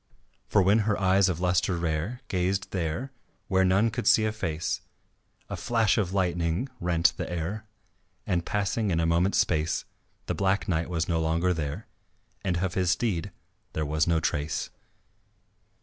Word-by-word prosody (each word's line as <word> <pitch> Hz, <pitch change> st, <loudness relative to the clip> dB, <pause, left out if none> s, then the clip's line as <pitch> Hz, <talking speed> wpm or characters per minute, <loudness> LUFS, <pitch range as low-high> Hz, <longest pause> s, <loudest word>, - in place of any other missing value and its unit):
For 100 Hz, -, +4 dB
when 100 Hz, +4 st, +4 dB
her 105 Hz, -, +1 dB
eyes 95 Hz, 0 st, +4 dB
of 85 Hz, -2 st, -2 dB
lustre 90 Hz, 0 st, +1 dB
rare 85 Hz, +9 st, -2 dB
Gazed 95 Hz, 0 st, -1 dB
there, 90 Hz, -, -2 dB, 0.4 s
where 95 Hz, 0 st, +3 dB
none 100 Hz, +5 st, +3 dB
could 105 Hz, -, -3 dB
see 115 Hz, -2 st, +5 dB
a 110 Hz, -, +1 dB
face, 85 Hz, -7 st, -2 dB, 0.7 s
A -, -, -4 dB
flash 115 Hz, -5 st, +2 dB
of 95 Hz, -5 st, 0 dB
lightning 90 Hz, +3 st, 0 dB
rent 85 Hz, -3 st, +2 dB
the -, -, -4 dB
air; 95 Hz, +6 st, -4 dB, 0.6 s
And, 85 Hz, -2 st, 0 dB
passing 105 Hz, +2 st, -1 dB
in 85 Hz, -3 st, +1 dB
a 85 Hz, -, +2 dB
moment's 85 Hz, +4 st, +2 dB
space, 80 Hz, -1 st, +1 dB, 0.4 s
The -, -, -1 dB
Black 100 Hz, +1 st, 0 dB
Knight 85 Hz, -2 st, 0 dB
was 85 Hz, -2 st, -1 dB
no 85 Hz, -2 st, +1 dB
longer 85 Hz, +3 st, +1 dB
there 80 Hz, +4 st, -4 dB, 0.6 s
And 90 Hz, -2 st, 0 dB
of 90 Hz, 0 st, -1 dB
his 90 Hz, -2 st, +1 dB
steed 90 Hz, -2 st, 0 dB, 0.4 s
there 80 Hz, -, -1 dB
was 75 Hz, +1 st, +1 dB
no 85 Hz, -1 st, +3 dB
trace. 75 Hz, -1 st, -2 dB
90 Hz, 165 wpm, -27 LUFS, 85-100 Hz, 0.7 s, see